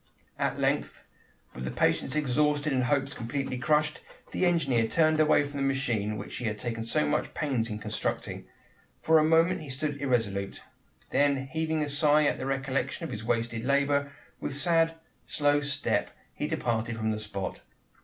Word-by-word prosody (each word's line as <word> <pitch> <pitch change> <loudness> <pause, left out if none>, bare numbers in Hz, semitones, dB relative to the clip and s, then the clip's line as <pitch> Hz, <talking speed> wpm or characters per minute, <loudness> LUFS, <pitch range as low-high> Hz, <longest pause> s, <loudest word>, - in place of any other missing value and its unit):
At - - 0
length, - - -1 0.5
with 65 0 -5
patience - - +1
exhausted 150 +1 +1
and 130 -1 +2
hopes 135 +1 +1
completely 125 +2 -3
crushed, 150 +2 +1 0.3
the 185 - +2
engineer 135 -10 +2
turned 155 +3 +3
away 155 -1 +5
from 145 0 -6
the 140 - 0
machine 115 -6 -1
which - - -7
he 125 - -4
had 105 -1 -1
taken 115 0 -3
so 115 -9 +1
much 75 - -1
pains 130 -7 0
in 105 - -3
constructing. 105 - -3 0.5
For 160 0 +5
a - - +4
moment 165 +3 +3
he 150 - -9
stood 140 +2 -3
irresolute. 105 -7 -1 0.5
Then 140 -2 +2
heaving 160 +1 -1
a - - -2
sigh 150 +1 +4
at - - +1
the 130 - -3
recollection 135 +2 -1
of 165 - -4
his 110 -2 -5
wasted 115 0 -1
labour, 140 +1 +2 0.3
with 140 - -4
sad, 165 +1 +3 0.3
slow 145 0 +2
step 145 0 0 0.2
he - - -3
departed 115 0 -1
from 110 0 0
the 110 - -2
spot. 100 -3 -5
140 Hz, 170 wpm, -28 LUFS, 115-150 Hz, 0.5 s, away